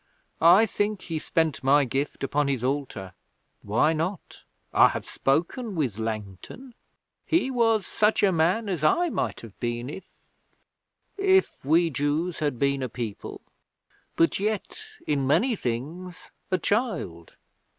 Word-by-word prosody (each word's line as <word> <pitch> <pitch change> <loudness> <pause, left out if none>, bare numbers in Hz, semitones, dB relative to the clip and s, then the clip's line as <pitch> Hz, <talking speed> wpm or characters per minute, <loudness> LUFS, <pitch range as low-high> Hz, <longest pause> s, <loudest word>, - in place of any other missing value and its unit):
I 175 +7 +7
think 205 -1 -2
he 165 -2 -3
spent 160 -2 -1
my 140 +2 +4
gift 135 +4 -3
upon 145 +1 0
his 135 -4 -1
altar. 125 -9 -3 0.5
Why 120 +10 +2
not? 165 +4 -4 0.3
I - - +7
have - - -4
spoken 180 - -1
with 130 - -1
Langton. 110 - -6 0.5
He 320 -5 +1
was 225 -4 +2
such 210 0 +1
a 200 - +5
man 180 +7 +1
as 175 -6 -3
I 345 - +3
might - - -2
have 115 -4 -13
been 120 +2 -3
if 190 +3 -10 1.1
if 385 -1 +3
we 165 +4 +3
Jews 150 +5 -1
had 145 -5 -1
been 140 +1 +1
a 130 - -2
people. 115 -4 -6 0.7
But 165 - +2
yet, 215 - -2 0.2
in 140 -3 0
many 235 - +3
things, 165 - -5 0.2
a 185 - +2
child. 180 - -2
155 Hz, 140 wpm, -26 LUFS, 130-205 Hz, 1.1 s, I